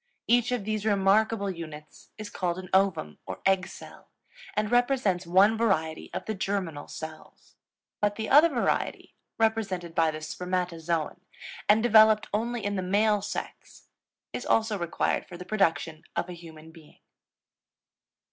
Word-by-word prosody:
Each 240 +1 +3
of 245 -4 -1
these 215 -1 -2
remarkable 200 0 +2
units 155 -3 -10
is 215 -1 -7
called 175 -2 -2
an 185 -1 -8
Ovum, 190 - +1
or - - -6
egg 190 -1 +3
cell, - - -13 0.5
and 210 +1 -1
represents 245 -8 +1
one 195 +5 +5
variety 175 -9 0
of - - -5
the 220 - -2
germinal 190 -6 -3
cells. 160 0 -10 0.5
But 205 0 +1
the 220 0 -4
other 300 +4 +7
variety, 250 -6 -1 0.2
represented 200 -7 0
by 165 -1 +3
the 155 0 -5
Spermatozoon 170 -1 -3 0.5
and 215 +2 +5
developed 220 -2 +6
only 230 +1 -2
in 205 0 -1
the - - -1
male 205 +3 +2
sex, 205 - -7 0.4
is - - -4
also 220 -1 +1
required 170 -4 -1
for 175 - -9
the 180 - -9
production 170 -6 0
of 180 - -2
a - - -5
human 160 -2 -12
being. 160 -2 -17
195 Hz, 145 wpm, -27 LUFS, 170-220 Hz, 0.5 s, other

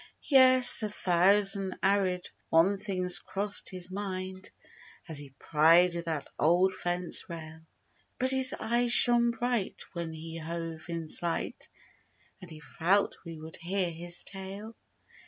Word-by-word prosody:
Yes, 255 -3 +6
a 215 - -3
thousand 195 +1 +1
arid 190 -2 0 0.2
one 185 +5 +2
things 185 -3 -1
crossed 205 +1 0
his 185 -1 -4
mind 190 -1 -6 0.6
As 160 -4 0
he 140 -2 -11
pried 165 +5 +3
with 170 0 -6
that 160 -4 -5
old 180 +4 +1
fence 175 -1 -3
rail— 160 -1 -11 0.5
But 260 +1 +1
his 265 0 +4
eyes 240 +1 0
shone 240 0 +8
bright 235 -3 -3
when 170 -2 -6
we 160 +1 -9
hove 165 0 -8
in 165 -1 -6
sight 170 +2 -4 0.7
And 180 - -12
he 155 -2 -11
felt 180 +5 -1
we 165 -2 -10
would 160 +1 -10
hear 180 0 -3
his 175 +1 -4
tale. 200 +3 -8
180 Hz, 140 wpm, -28 LUFS, 165-200 Hz, 0.7 s, shone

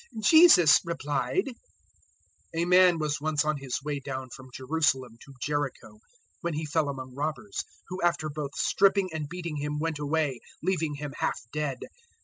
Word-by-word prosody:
010:030 220 - -6
Jesus 315 - +8
replied, 170 - -2 1.0
"A 165 +1 +1
man 180 -1 +6
was 150 -2 -2
once 155 -1 +1
on 155 -1 0
his 135 -2 -4
way 145 -1 -2
down 130 -2 -6
from 130 +1 -11
Jerusalem 130 -3 0
to 140 - -14
Jericho 140 -6 -3 0.4
when 170 -4 -3
he 155 +1 -3
fell 155 -1 0
among 130 -2 -6
robbers, 155 +9 -3 0.3
who 185 +1 -5
after 170 -3 +1
both 145 -1 -5
stripping 195 -1 +2
and 150 -2 -4
beating 170 -3 -5
him 150 +1 -3
went 160 0 -2
away, 145 -3 0 0.2
leaving 165 -5 0
him 145 -1 -6
half - - 0
dead. 150 -4 -2
150 Hz, 160 wpm, -28 LUFS, 140-170 Hz, 1.0 s, Jesus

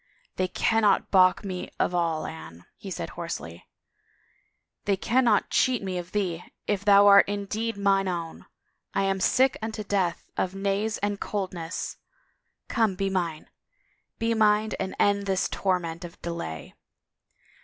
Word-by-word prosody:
They 185 - +1
cannot 215 +1 +2
balk 185 +1 +5
me 185 -2 -4
of - - +1
all, 165 -3 0
Anne," 80 +2 -9
he 195 - -9
said 170 -2 -5
hoarsely. 85 - -7 1.2
They 200 -1 +2
cannot 240 +4 +2
cheat 250 -4 +2
me 185 -2 -2
of 175 0 -8
thee, 180 -5 -1 0.2
if 200 -2 -1
thou 200 -1 +7
art 200 0 +7
indeed 205 +2 -3
mine 195 -1 +2
own. 170 -3 -5 0.5
I - - +2
am 195 0 0
sick 260 +7 +3
imto 220 -2 -5
death 185 -4 -1
of 185 +1 -1
nays 200 +2 -1
and 205 -1 -1
coldness 185 -5 -4 0.4
— - - -50
'5ome, 220 -6 +1
be 195 0 -1
mine. 170 -5 -3 0.7
Be 230 0 0
mine 215 -1 +3
and 190 0 -3
end 200 0 +2
this 190 -1 +1
torment 180 -3 -2
of 175 0 -10
delay 170 - -5
195 Hz, 145 wpm, -26 LUFS, 175-205 Hz, 1.2 s, thou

